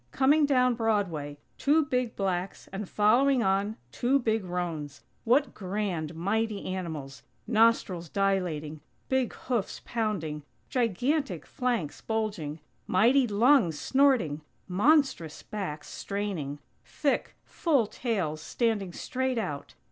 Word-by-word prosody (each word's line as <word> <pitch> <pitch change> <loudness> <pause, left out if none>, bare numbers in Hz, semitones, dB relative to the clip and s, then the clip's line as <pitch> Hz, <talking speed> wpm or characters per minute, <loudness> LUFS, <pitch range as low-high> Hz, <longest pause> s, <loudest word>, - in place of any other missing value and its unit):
Coming 285 - +4
down 255 -3 +4
Broadway! 195 -11 -1 0.2
Two 300 +2 +3
big 250 -4 -1
blacks, 185 -1 -2
and 195 0 -5
following 245 +5 +4
on, 200 +2 +1
two 255 - +2
big 225 -5 0
roans! 175 -5 -4 0.2
What 255 +3 +3
grand, 185 -5 -3
mighty 210 +4 -1
animals! 160 -7 -5 0.2
Nostrils 220 -6 +2
dilating; 175 -7 -1 0.3
big 260 -2 +1
hoofs 240 -6 -3
pounding; 190 -10 -2 0.3
gigantic 245 - 0
flanks 240 - -2
bulging; 200 -9 -3 0.3
mighty 245 +7 +4
lungs 210 - +4
snorting; 255 - +2 0.3
monstrous 205 - +2
backs 170 -8 -5
straining; 195 -9 -4 0.3
thick, 285 -2 -1
full 285 -9 +1
tails 190 -10 -2
standing 210 -5 -1
straight 260 +4 -2
out. 145 -10 -4
210 Hz, 110 wpm, -28 LUFS, 175-250 Hz, 0.3 s, Coming